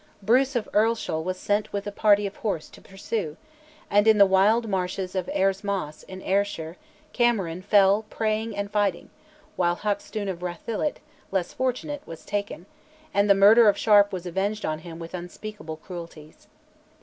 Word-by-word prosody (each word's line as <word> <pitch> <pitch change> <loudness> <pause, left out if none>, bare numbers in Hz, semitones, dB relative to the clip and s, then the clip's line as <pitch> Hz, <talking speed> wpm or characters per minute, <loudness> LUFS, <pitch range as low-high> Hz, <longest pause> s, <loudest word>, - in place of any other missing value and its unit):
Bruce 255 +6 +3
of 235 - -1
Earlshall 215 -7 +1
was 185 +2 -3
sent 205 +3 -1
with 200 0 -3
a 205 - -4
party 205 0 +3
of 200 - -6
horse 200 -8 -3
to - - -16
pursue, 195 -4 -4 0.5
and, 205 +2 +3
in 220 -1 +6
the 200 - +8
wild 205 +5 +3
marshes 185 -1 -2
of 185 -2 -2
Airs 195 +1 +1
Moss, 195 -7 -3
in 190 0 -10
Ayrshire, 190 -4 -1 0.4
Cameron 200 -9 +1
"fell 200 +1 +4
praying 215 0 -2
and 200 0 -3
fighting"; 205 -4 -1 0.5
while 175 -1 +2
Hackstoun 205 +1 -3
of 185 -3 -4
Rathillet, 195 - -3 0.3
less 190 -3 -2
fortunate, 260 +3 -2
was 165 - -10
taken, 205 -4 -4 0.5
and 200 +1 +2
the 200 - +7
murder 210 +3 +7
of 205 - +1
Sharp 205 -2 +5
was 185 -2 -5
avenged 195 +4 -2
on 155 0 -2
him 165 0 -9
with 165 +1 -9
unspeakable 180 -1 -7
cruelties. 165 -3 -11
200 Hz, 165 wpm, -25 LUFS, 180-215 Hz, 0.5 s, the